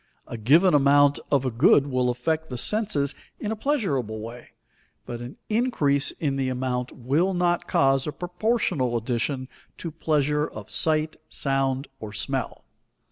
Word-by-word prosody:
A - - -7
given 150 - +4
amount 145 0 +5
of 135 -2 +2
a 130 - 0
good 130 +4 +5
will 130 -3 0
affect 160 +6 -1
the 125 - -5
senses 155 - +1 0.3
in 210 - -3
a - - -1
pleasurable 165 - -1
way, 115 +3 -9 0.6
but 120 0 -6
an 120 +3 -8
increase 210 - +2
in 140 -4 -2
the 135 -1 0
amount 125 -1 -2
will 155 +10 0
not 175 -1 +1
cause 135 0 +2
a - - -1
proportional 180 - -1
addition 125 +3 -2 0.3
to 165 - -5
pleasure 150 -1 0
of - - -10
sight, 155 0 +1
sound, 135 0 -1
or 105 -2 -8
smell. - - -2
140 Hz, 150 wpm, -25 LUFS, 125-160 Hz, 0.6 s, amount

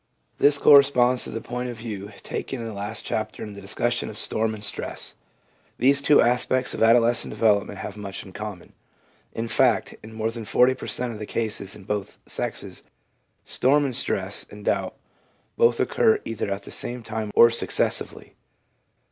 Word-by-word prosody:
This 145 0 +4
corresponds 135 -4 +5
to - - -6
the 115 - -5
point 125 +1 -4
of 120 - -7
view 105 -3 -7
taken 135 - -5
in 115 - -5
the 110 - -6
last 105 +2 -5
chapter 110 0 -3
in 105 - -7
the 100 - -10
discussion 120 +5 -1
of 105 - -9
storm 110 +1 0
and 105 - -7
stress. 100 - -1 0.6
These 140 +2 +4
two 145 +1 +5
aspects 125 +1 +1
of - - -5
adolescent 115 +1 +4
development 105 -2 +1
have 100 +1 -7
much 100 -2 -6
in 95 - -12
common; 105 -4 -8 0.6
in 115 +1 -3
fact, 120 -3 +2
in 110 - -11
more 110 0 -2
than 115 -1 -7
40 125 +5 +3
per - - -8
cent, 125 -1 -1
of 105 - -9
the 105 - -6
cases 105 -4 -3
in 100 - -13
both 105 0 -4
sexes, - - -5 0.6
storm 145 +3 +2
and 130 -3 -2
stress 100 -6 0
and 105 -1 -12
doubt - - -1 0.6
both 115 0 +3
occur 220 -1 +3
either 110 -2 -3
at 100 0 -3
the - - -10
same 120 0 -4
time 110 -1 -4
or 115 - +7
successively. 115 - -1
115 Hz, 180 wpm, -24 LUFS, 105-125 Hz, 0.6 s, or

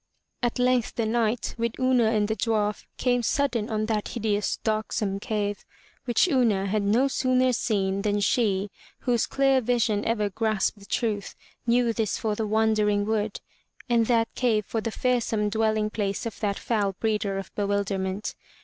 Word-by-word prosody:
At 240 -2 0
length 250 -2 +1
the 230 - 0
Knight, 225 +1 0
with 235 +1 -2
Una 255 -2 +3
and 215 -2 +2
the 220 - -1
dwarf, 210 -3 -1
came 245 -1 +1
sudden 240 -3 0
on 215 -1 -1
that 215 -2 -1
hideous, 210 -3 -1
darksome 215 -2 -1
cave, 205 -1 -2 0.4
which 245 +8 +3
Una 235 - +2
had 205 +2 0
no 220 +7 +3
sooner 255 -1 +2
seen, 200 -4 0
than 205 0 0
she, 205 -2 +1 0.3
whose 240 -3 +1
clear 270 -1 +3
vision 225 -3 +1
ever 220 -2 0
grasped 215 0 0
the 200 - -15
truth, 210 -4 -2 0.3
knew 235 0 +3
this 220 -3 -1
for 220 -1 -1
the 215 +1 -2
Wandering 210 -1 +2
Wood 215 -1 -1 0.5
and 235 -2 +2
that 230 -2 +2
cave 220 -5 +1
for 225 - -2
the 230 - -2
fearsome 225 -3 0
dwelling 215 0 +1
place 200 -1 -2
of 230 - -5
that 200 -2 -1
foul 205 -4 0
breeder 210 -1 -1
of 195 - -7
bewilderment. 200 -1 -1
220 Hz, 165 wpm, -26 LUFS, 205-235 Hz, 0.5 s, Una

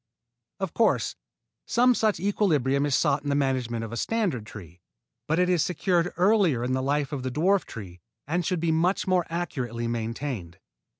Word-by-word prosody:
Of 195 -3 -3
course, 230 - +2 0.5
some 250 +1 +4
such 220 -3 +1
equilibrium 150 - +1
is 140 - +2
sought 145 -2 +2
in 145 - -4
the 140 - +1
management 130 -5 0
of 115 - -9
a 120 - -4
standard 180 - -1
tree; 90 -5 -11 0.5
but 160 - +1
it 180 0 +3
is 180 -3 +2
secured 180 +1 +1
earlier 180 - +3
in 125 +1 -1
the 130 - 0
life 140 +1 0
of 140 -3 -3
the 130 - -2
dwarf 180 +9 +2
tree 90 -5 -9 0.2
and 175 +5 -1
should 180 +1 -1
be 165 -1 +1
much 175 +4 +1
more 185 -3 +1
accurately 125 -9 -3
maintained. 115 - -4
145 Hz, 180 wpm, -26 LUFS, 120-180 Hz, 0.5 s, some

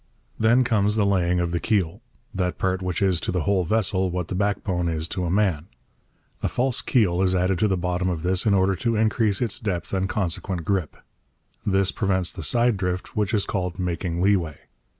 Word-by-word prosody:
Then 120 +3 +4
comes 105 -3 +1
the 105 -2 +2
laying 90 -3 +2
of 85 -1 -1
the 85 - 0
keel, 95 -6 0 0.3
that 90 -1 -1
part 95 0 -1
which 90 +1 -1
is 95 -4 +2
to - - -2
the 90 -1 0
whole 100 +1 +1
vessel 95 -1 +1
what 90 -1 -3
the - - -3
backbone 95 -3 -1
is 80 0 -2
to 90 -2 -2
a - - -1
man. 90 -4 +1 0.7
A - - 0
false 125 0 0
keel 95 -8 +2
is 95 -1 +2
added 90 0 +1
to 110 - +3
the 95 -2 0
bottom 90 +1 -1
of 85 -3 -3
this 90 +3 +1
in 100 - +4
order 95 0 +3
to 115 +5 0
increase 110 0 +1
its 115 - -1
depth 90 -5 -3
and 95 0 0
consequent 90 -3 -2
grip. 95 -4 -1 0.7
This 95 -1 +2
prevents 95 -3 0
the - - -8
side 120 +7 +2
drift 90 -1 -3
which 105 -2 0
is 105 -3 +1
called 90 -3 -3
making 90 -1 -2
leeway. 90 -7 +1
95 Hz, 205 wpm, -24 LUFS, 90-100 Hz, 0.7 s, Then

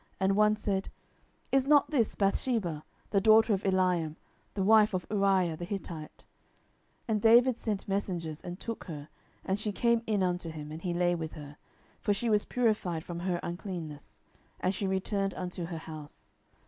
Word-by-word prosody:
And 190 +1 +2
one 210 0 +4
said, 200 -2 -2 0.6
Is 270 0 +3
not 290 +1 +5
this 240 -8 +1
Bathsheba, 195 - 0 0.3
the 200 - +3
daughter 220 +1 +6
of 195 - 0
Eliam, 180 -5 +1 0.4
the 195 - 0
wife 215 0 +5
of 180 - -2
Uriah 195 -5 +2
the 175 - -7
Hittite? 175 -4 -6 0.8
10:011:004 - - -14
And 215 -2 +1
David 240 +2 +6
sent 210 -3 -3
messengers, 175 -6 -2
and 175 +2 -7
took 230 -1 -5
her; 150 -4 -8 0.4
and 190 +2 0
she 210 0 -1
came 235 +2 +2
in 210 -3 +1
unto 180 -2 -1
him, 150 -1 -7
and 160 +1 -7
he 175 -1 -2
lay 175 0 +2
with 160 -2 -4
her; 145 -2 -9 0.4
for 205 - +1
she 230 +2 -1
was 210 -1 +3
purified 210 -9 0
from 170 -1 -6
her 175 0 -1
uncleanness: 170 -4 -6 0.4
and 185 - 0
she 195 0 -2
returned 195 +1 -1
unto 180 -1 -4
her 165 -1 -5
house. 155 -2 -10
190 Hz, 175 wpm, -30 LUFS, 170-210 Hz, 0.8 s, daughter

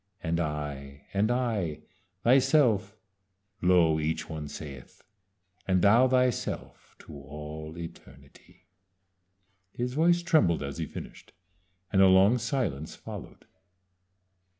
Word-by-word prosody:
'And 85 0 -1
I 75 -3 -5
and 100 +3 +2
I 110 -11 -1 0.4
thyself' 125 -5 +3 0.6
(lo! 85 -3 +4
each 80 +1 -2
one 80 -2 -6
saith) 70 -3 -10 0.6
'And 95 -2 +2
thou 115 +6 +6
thyself 125 -1 -1
to - - -11
all 75 +2 -8
eternity.'" 85 -1 -13 1.1
His 125 +3 -3
voice 170 +4 +3
trembled 100 - +3
as 70 +3 -6
he 80 - -3
finished, - - -10 0.6
and 95 - +5
a 95 - +8
long 95 +6 +5
silence 110 - -2
followed. - - -10
90 Hz, 105 wpm, -28 LUFS, 75-120 Hz, 1.1 s, a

